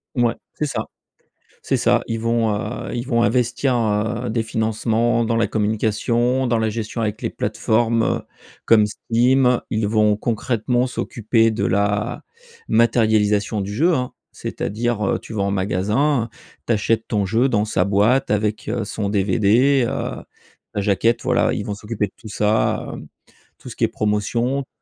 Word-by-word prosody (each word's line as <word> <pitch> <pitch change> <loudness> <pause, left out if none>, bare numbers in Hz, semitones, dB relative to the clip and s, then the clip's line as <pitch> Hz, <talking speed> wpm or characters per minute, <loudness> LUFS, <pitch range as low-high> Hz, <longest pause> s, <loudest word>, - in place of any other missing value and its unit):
Mouais, 120 -2 +2 0.2
c'est 150 - -2
ça, 140 - -3 0.8
c'est - - 0
ça. - - +3
Ils 115 0 -2
vont, 115 -1 +1
heu, 105 +3 -4
ils 120 +1 -4
vont 115 -3 +2
investir, 125 +2 +1
heu, 115 +1 0
des 115 0 0
financements 110 +1 0
dans 115 0 0
la 115 - +2
communication, 115 +4 0
dans 120 -2 +1
la 110 - +1
gestion 110 +1 -4
avec 110 +1 -2
les 115 - -1
plateformes, 115 +2 0
heu, - - 0 0.4
comme 110 -2 +5
Steam, 125 +4 +2
ils 110 -2 0
vont 105 -1 +3
concrètement 120 +2 0
s'occuper 115 -2 +1
de 110 - -1
la 105 +3 0 0.4
matérialisation 110 -3 +2
du 100 +1 -4
jeu, 165 +10 +3
hein. 125 -2 -2 0.2
C'est-à-dire, 115 +1 -3
heu, - - 0
tu - - -12
vas 105 - -1
en 100 - 0
magasin, 105 +8 0 0.4
tu - - +1
achètes 110 +2 0
ton 105 -2 0
jeu 115 +7 +2
dans 105 -3 +1
sa 95 -4 +1
boîte 105 +7 +2
avec, 105 0 -1
heu, 115 0 -1
son 105 -2 -3
DVD. 110 +7 +3
Heu, - - -4 0.5
la 100 - -1
jaquette, 105 +4 +1
voilà, - - +2
ils - - -3
vont 105 - -3
s'occuper 105 0 -3
de 95 - -20
tout 110 - -11
ça, 105 +1 0
hem, - - -9 0.5
tout - - -14
ce - - -9
qui - - -1
est - - +1
promotion, 115 +6 -1
tout - - -25
110 Hz, 170 wpm, -21 LUFS, 105-120 Hz, 0.8 s, comme